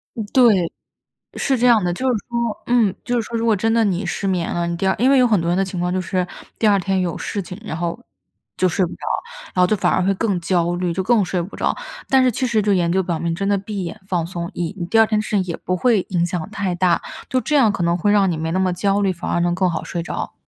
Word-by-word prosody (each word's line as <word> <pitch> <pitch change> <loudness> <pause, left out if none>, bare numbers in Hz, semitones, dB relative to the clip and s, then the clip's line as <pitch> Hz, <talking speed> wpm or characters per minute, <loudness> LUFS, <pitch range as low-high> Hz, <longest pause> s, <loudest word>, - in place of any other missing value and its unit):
嗯， 220 - -3
对， 210 -10 +4 0.6
是 265 -2 +1
这 245 - +1
样 230 -5 +5
的。 175 - 0
就 255 - -4
是 - - +1
说 235 -2 -2
嗯， 235 -6 +3
就 245 - 0
是 235 - +2
说 230 +1 -4
如 230 - -1
果 225 - +4
真 225 +3 +1
的 230 -1 +3
你 185 0 -1
失 195 +2 -2
眠 180 -3 -1
了， 170 0 -1
你 170 - -2
第 185 +3 -2
二 190 - +3
因 255 +3 +4
为 275 - +5
有 255 - +5
很 215 -5 +3
多 170 - -2
人 175 - +1
的 195 - +2
情 185 -1 -5
况 180 +1 -1
就 185 - 0
是， 180 +1 -1 0.3
第 220 - +3
二 205 -1 +5
天 190 0 0
有 175 -3 -1
事 205 - -3
情， 185 +1 -8
然 185 -7 -5
后 170 +4 -2 0.6
就 185 - +3
睡 185 +1 +1
不 170 - -7
着。 - - -9 0.6
然 180 - +3
后 - - +6
就 215 - +2
反 - - +1
而 185 - +2
会 195 +2 +2
更 200 -3 0
焦 175 0 +1
虑， 175 0 -1
就 190 - -1
更 220 +1 +3
睡 180 -1 -1
不 180 +4 -8
着。 - - 0 0.4
但 265 -1 +5
是 255 - +4
其 255 +3 -1
实 220 -3 +1
就 205 -1 +2
研 175 -2 +1
究 190 +2 +2
表 175 -2 -2
明 165 +1 -2
真 195 +4 -2
的 200 -1 +2
闭 200 -1 -5
眼 170 - -6
放 175 -4 0
松， 170 -1 -5
以 175 +3 -3
你 175 - -3
第 225 - +3
二 220 - +6
天 215 - +1
的 - - +1
事 - - -7
情 190 - +2
也 170 - -3
不 185 - -2
会 230 -1 +3
影 175 -2 +1
响 175 -1 -3
太 195 -4 -2
大。 175 -1 +2 0.3
就 255 - +1
这 300 - -1
样 235 -7 +5
可 195 - -4
能 170 +1 +2
会 205 +4 +1
让 200 -2 +4
你 170 - -1
没 160 +1 -2
那 185 - 0
么 185 -1 +2
焦 200 +2 +1
虑， 195 -2 +2
反 170 - -5
而 - - +1
能 175 0 +1
更 185 -1 +1
好 165 - -3
睡 170 - -4
着。 - - -5
190 Hz, 325 characters per minute, -20 LUFS, 175-215 Hz, 0.6 s, 后